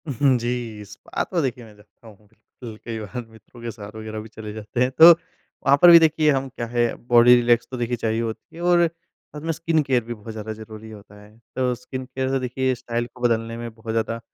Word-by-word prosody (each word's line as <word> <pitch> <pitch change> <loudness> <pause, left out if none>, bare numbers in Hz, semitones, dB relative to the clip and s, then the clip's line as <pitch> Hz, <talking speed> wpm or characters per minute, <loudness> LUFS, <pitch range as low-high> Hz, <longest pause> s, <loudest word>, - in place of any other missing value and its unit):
उ, - - -2
हुँ, 135 0 +3
जी, 120 -3 -4
स्पा 100 0 -5
तो 175 -3 -2
देखिए 125 -3 -3
मैं 105 -2 -16
जाता 105 +2 -21
हूँ, 105 -1 -17 0.4
अल 110 -3 -7
कई 115 -1 -4
बार 115 +3 -6
मित्रों 110 +2 -17
के 120 0 -5
साथ 105 -1 -11
वग़ैरह 110 0 -6
भी 110 +1 -9
चले 105 -1 -9
जाते 110 +2 -4
हैं। 125 +1 +2
तो 165 +5 +9
वहाँ 145 -4 -1
पर 175 - +9
भी 170 - +10
देखिए 155 -1 +3
हम 135 -1 -1
क्या 120 -2 -5
है, 120 0 +1
अब - - -10
बॉडी 120 0 +7
रिलैक्स 120 -1 +2
तो 130 - -4
देखिए 120 0 -1
चाहिए 110 0 -1
होती 115 +5 -6
है, 170 - -9
और 175 -1 +4
साथ 165 -2 -15
में 165 +2 -2
स्किन 160 0 0
केयर 130 -4 +1
भी 120 +1 -6
बहुत 110 0 -10
ज़्यादा 110 0 -6
ज़रूरी 110 0 -11
होता 105 -1 -14
है। 105 +2 -18 0.2
तो 130 -1 +1
स्किन 130 +1 -7
केयर 130 0 -3
तो 135 0 0
देखिए 130 +1 -1
स्टाइल 120 0 -3
को 125 - -16
बदलने 115 -1 0
में 120 0 -6
बहुत 110 0 -7
ज़्यादा 115 0 -1
120 Hz, 245 wpm, -23 LUFS, 110-130 Hz, 0.4 s, भी